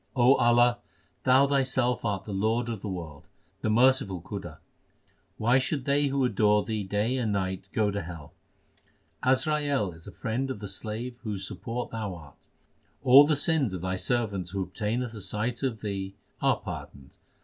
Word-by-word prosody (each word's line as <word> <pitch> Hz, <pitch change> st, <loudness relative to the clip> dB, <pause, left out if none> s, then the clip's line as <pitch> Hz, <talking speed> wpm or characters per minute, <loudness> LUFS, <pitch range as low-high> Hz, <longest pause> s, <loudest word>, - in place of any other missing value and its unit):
Allah, 120 Hz, -1 st, +5 dB, 0.5 s
Thou 130 Hz, +1 st, +6 dB
Thyself 130 Hz, -3 st, +1 dB
art 100 Hz, -4 st, -2 dB
the 105 Hz, -, -5 dB
Lord 110 Hz, +4 st, 0 dB
of 110 Hz, -4 st, -4 dB
the 105 Hz, -, -4 dB
world, 85 Hz, -6 st, -7 dB, 0.3 s
the 110 Hz, -, 0 dB
merciful 115 Hz, -5 st, +3 dB
Khuda. 95 Hz, +4 st, -7 dB
2 -, -, -32 dB, 0.8 s
Why 120 Hz, +4 st, +3 dB
should 130 Hz, +1 st, -2 dB
they 145 Hz, +1 st, +2 dB
who 135 Hz, -1 st, +1 dB
adore 105 Hz, -4 st, +3 dB
Thee 110 Hz, -2 st, -2 dB
day 105 Hz, +6 st, 0 dB
and 115 Hz, -4 st, 0 dB
night 95 Hz, -1 st, -2 dB
go 105 Hz, -2 st, +1 dB
to 100 Hz, 0 st, -2 dB
hell? 80 Hz, -3 st, -9 dB, 0.9 s
Azrail 140 Hz, -, +1 dB
is 80 Hz, 0 st, -12 dB
a -, -, -7 dB
friend 125 Hz, +3 st, -3 dB
of 130 Hz, -, -3 dB
the 100 Hz, 0 st, -6 dB
slave 110 Hz, +5 st, -4 dB
whose 100 Hz, -4 st, -4 dB
support 115 Hz, +5 st, -5 dB
Thou 110 Hz, -5 st, -4 dB
art. 75 Hz, -4 st, -15 dB, 0.6 s
All 135 Hz, +3 st, +8 dB
the 155 Hz, -, +3 dB
sins 145 Hz, -, +1 dB
of 90 Hz, -, -6 dB
Thy 95 Hz, +1 st, -1 dB
servant 100 Hz, -4 st, -1 dB
who 95 Hz, +1 st, -2 dB
obtaineth 115 Hz, +5 st, -3 dB
a 105 Hz, -, -8 dB
sight 105 Hz, +5 st, -2 dB
of 125 Hz, -5 st, -2 dB
Thee, 95 Hz, -2 st, -4 dB, 0.3 s
are -, -, +3 dB
pardoned. 70 Hz, 0 st, -9 dB
110 Hz, 170 wpm, -28 LUFS, 100-125 Hz, 0.9 s, All